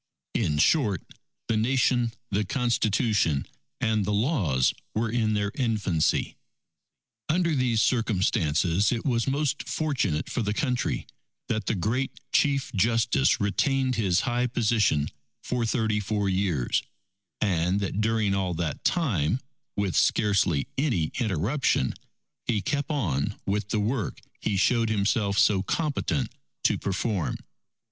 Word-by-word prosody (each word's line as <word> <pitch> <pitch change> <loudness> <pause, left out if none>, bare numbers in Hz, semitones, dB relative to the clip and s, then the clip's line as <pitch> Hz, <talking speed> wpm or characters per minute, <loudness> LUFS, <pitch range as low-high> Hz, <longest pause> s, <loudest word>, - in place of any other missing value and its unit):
In 75 - 0
short, 105 - +3 0.4
the 115 - +1
Nation, 120 0 +2 0.2
the 105 +2 +1
Constitution, 110 - +1 0.3
and 110 -2 +1
the 105 - -1
Laws 100 - +2 0.2
were 110 +1 0
in 110 -2 +1
their 100 -1 0
infancy. 105 - 0 0.9
Under 170 +1 +2
these 125 -5 +2
circumstances, 95 - +1
it 120 -2 -2
was 120 -3 +1
most 145 +1 -1
fortunate 125 - -1
for - - -2
the 105 -1 -1
Country, 125 -4 -1 0.4
that 110 -2 -1
the 110 - +1
great 115 +8 -1
Chief 140 -2 +1
Justice 115 +5 +2
retained 130 +6 +1
his 100 -5 +2
high 120 0 0
position 105 -11 +2 0.4
for 120 -2 -1
thirty 110 -2 +1
four 105 0 -1
years, 95 -9 +1 0.6
and 90 -1 +1
that 100 +1 -2
during 110 -2 +1
all 95 -3 -1
that 80 -2 -3
time, 115 - +1 0.4
with 100 -3 0
scarcely 95 -8 +2
any 115 - +1
interruption, 105 - +1 0.5
he 110 -3 +1
kept 145 +9 -2
on 90 - -1
with 100 +1 -1
the 110 - 0
work 110 +3 -2 0.2
he 100 -2 -1
showed 115 +3 +2
himself 100 -1 +1
so 100 -3 +4
competent 150 - -1 0.3
to - - +3
perform. 100 -2 -1
110 Hz, 125 wpm, -26 LUFS, 95-125 Hz, 0.9 s, so